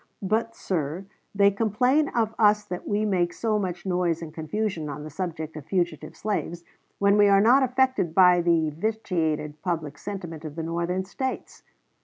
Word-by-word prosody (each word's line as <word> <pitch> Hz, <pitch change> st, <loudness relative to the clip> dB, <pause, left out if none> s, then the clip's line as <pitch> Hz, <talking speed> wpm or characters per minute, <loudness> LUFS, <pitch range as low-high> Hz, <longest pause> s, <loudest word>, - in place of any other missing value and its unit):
But, 225 Hz, +4 st, 0 dB
sir, 170 Hz, +1 st, -3 dB, 0.3 s
they 200 Hz, 0 st, +5 dB
complain 250 Hz, +8 st, +2 dB
of 225 Hz, -2 st, 0 dB
us 210 Hz, -1 st, +4 dB
that 180 Hz, 0 st, -6 dB
we 210 Hz, +1 st, 0 dB
make 180 Hz, -4 st, +1 dB
so 215 Hz, -2 st, 0 dB
much 180 Hz, -2 st, -4 dB
noise 180 Hz, -3 st, 0 dB
and 155 Hz, -2 st, -8 dB
confusion 165 Hz, 0 st, -3 dB
on 145 Hz, +1 st, -6 dB
the 155 Hz, -, -8 dB
subject 160 Hz, -2 st, -5 dB
of 150 Hz, -3 st, -9 dB
fugitive 170 Hz, -5 st, -2 dB
slaves, 175 Hz, -5 st, -3 dB, 0.3 s
when 200 Hz, +1 st, +3 dB
we 205 Hz, -, +7 dB
are 200 Hz, 0 st, +5 dB
not 240 Hz, +7 st, +5 dB
affected 255 Hz, -9 st, +1 dB
by 180 Hz, -2 st, +6 dB
the 165 Hz, -2 st, +2 dB
vitiated 160 Hz, -5 st, -2 dB
public 155 Hz, -5 st, -3 dB
sentiment 175 Hz, -6 st, -6 dB
of 155 Hz, -2 st, -7 dB
the 165 Hz, -, -4 dB
Northern 170 Hz, +3 st, -2 dB
States. 260 Hz, +7 st, -5 dB
180 Hz, 170 wpm, -25 LUFS, 160-210 Hz, 0.3 s, we